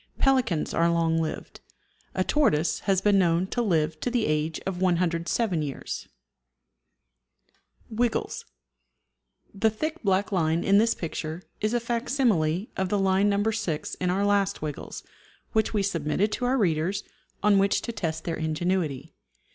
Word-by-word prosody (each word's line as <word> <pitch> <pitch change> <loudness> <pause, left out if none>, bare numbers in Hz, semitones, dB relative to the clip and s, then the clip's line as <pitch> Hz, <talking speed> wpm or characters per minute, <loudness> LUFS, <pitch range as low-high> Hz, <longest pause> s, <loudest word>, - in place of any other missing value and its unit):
Pelicans 255 - +2
are 170 0 +3
long 165 -1 +2
lived. 160 -1 -4 0.6
A - - +2
tortoise 170 - +2
has 190 -1 +3
been 205 -1 +4
known 170 0 +2
to 240 +5 -2
live 160 -7 +1
to - - -1
the 240 -2 +1
age 155 +1 0
of 190 -1 -3
107 175 +1 +1
years. 140 -3 -5 1.8
WIGGLES. 230 +1 -1 1.1
The 220 +3 +2
thick 310 +10 -4
black 195 0 +1
line 165 -2 +1
in 200 +1 +5
this 230 +1 +3
picture 160 0 -5 0.2
is 215 +3 0
a - - +3
facsimile 230 - 0
of 190 -1 -1
the 205 - +1
line 195 +1 +3
No. 200 0 +1
6 220 -8 -2
in 180 - -2
our 195 +3 +1
last 200 -1 +1
Wiggles, 150 -2 -6 0.5
which 220 -1 +1
we 210 -3 0
submitted 185 +2 0
to 250 - -2
our 255 +2 +2
readers, 185 -1 0 0.4
on 205 -1 +5
which 195 0 +2
to 235 - -3
test 160 -7 -3
their 165 - -3
ingenuity. 160 -2 -1
190 Hz, 150 wpm, -26 LUFS, 165-215 Hz, 1.8 s, in